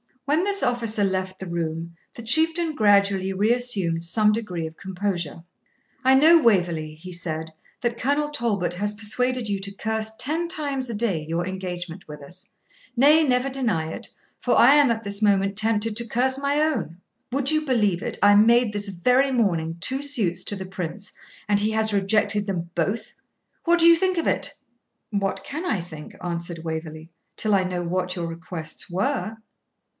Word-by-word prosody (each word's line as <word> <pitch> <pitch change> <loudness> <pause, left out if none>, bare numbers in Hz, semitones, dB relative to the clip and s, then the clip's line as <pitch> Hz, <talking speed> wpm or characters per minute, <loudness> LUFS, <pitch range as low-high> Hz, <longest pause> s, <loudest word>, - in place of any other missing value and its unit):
When 305 +6 +1
this 400 -1 +2
officer 230 -4 0
left 190 -1 -1
the 190 - -6
room, 165 0 -4 0.2
the 235 - -9
Chieftain 320 +6 +3
gradually 200 -4 +3
reassumed 205 -5 +1
some 210 +5 +2
degree 185 -7 -3
of 160 0 -9
composure. 180 -4 -4 0.6
'I 265 0 +6
know, 320 +4 +6
Waverley,' 175 - +1
he 180 +4 -10
said, 160 -2 -4 0.3
'that 235 -2 -2
Colonel 290 +3 0
Talbot 220 -11 -1
has 205 +3 -2
persuaded 250 +3 -1
you 200 -1 -1
to 200 +1 -5
curse 220 +1 -2
ten 320 +6 -1
times 285 -7 -2
a 230 - -3
day 205 -8 0
your 165 +2 -1
engagement 180 -1 -6
with 150 -1 -10
us; 180 +6 -12 0.5
nay, 295 +6 +5
never 255 -1 +1
deny 225 -13 -1
it, - - -5 0.3
for - - +1
I 275 - +7
am 290 -3 +5
at 230 -1 -1
this 200 0 -2
moment 200 -1 +2
tempted 220 0 +1
to 235 0 -2
curse 260 +4 0
my 280 +1 +1
own. 305 - -1 0.3
Would 275 +2 +3
you 310 0 +1
believe 210 - +1
it, - - -4
I 205 0 +7
made 230 +2 +4
this 205 0 -3
very 250 +9 +2
morning 170 -9 0
two 265 +8 0
suits 210 -12 0
to 205 - -1
the 190 -1 -6
Prince, 185 +1 -6 0.4
and 205 -1 +3
he 210 +1 +1
has 220 -1 +1
rejected 205 +1 +1
them 175 -3 -3
both; 200 +6 -2 0.5
what 345 0 +4
do 335 - +7
you 335 0 +8
think 370 0 0
of 335 - 0
it?' - - 0 0.6
'What 200 -2 -2
can 310 +5 -5
I 280 - 0
think,' 160 -3 -10
answered 170 -1 -4
Waverley, 160 0 -6 0.2
'till 215 -1 0
I 190 -2 +3
know 180 -1 -3
what 180 +1 -2
your 175 -2 -3
requests 165 0 -7
were?' 215 +4 -2
205 Hz, 180 wpm, -24 LUFS, 175-250 Hz, 0.6 s, you